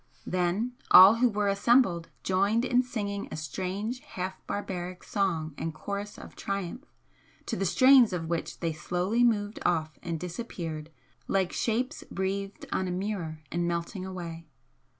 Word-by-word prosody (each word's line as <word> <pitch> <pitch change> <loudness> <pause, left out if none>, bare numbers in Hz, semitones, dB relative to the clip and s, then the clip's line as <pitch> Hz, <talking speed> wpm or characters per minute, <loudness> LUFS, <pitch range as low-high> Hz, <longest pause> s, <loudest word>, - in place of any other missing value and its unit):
Then 185 +7 0 0.2
all 195 +5 +10
who 245 +1 +4
were 210 -1 0
assembled 200 -4 +3
joined 200 +6 +2
in 250 0 +4
singing 205 -5 -4
a - - -4
strange 190 - -3
half 185 -5 -5
barbaric 185 -3 -4
song 170 -7 -1
and 160 -1 -3
chorus 200 +4 -5
of - - -11
triumph, 200 - -4 0.6
to 230 - -2
the 195 -3 0
strains 255 +5 +6
of 170 -3 -3
which 170 0 -3
they 165 -2 0
slowly 180 +9 0
moved 210 -3 +1
off 155 -3 0
and 165 -2 -3
disappeared 170 -4 -5 0.4
like 190 -2 +1
shapes 250 +6 -1
breathed 195 +1 -3
on 190 - 0
a - - -2
mirror 180 -5 -3
and 170 0 0
melting 170 +3 -3
away. 170 -3 -6
190 Hz, 150 wpm, -29 LUFS, 170-210 Hz, 0.6 s, all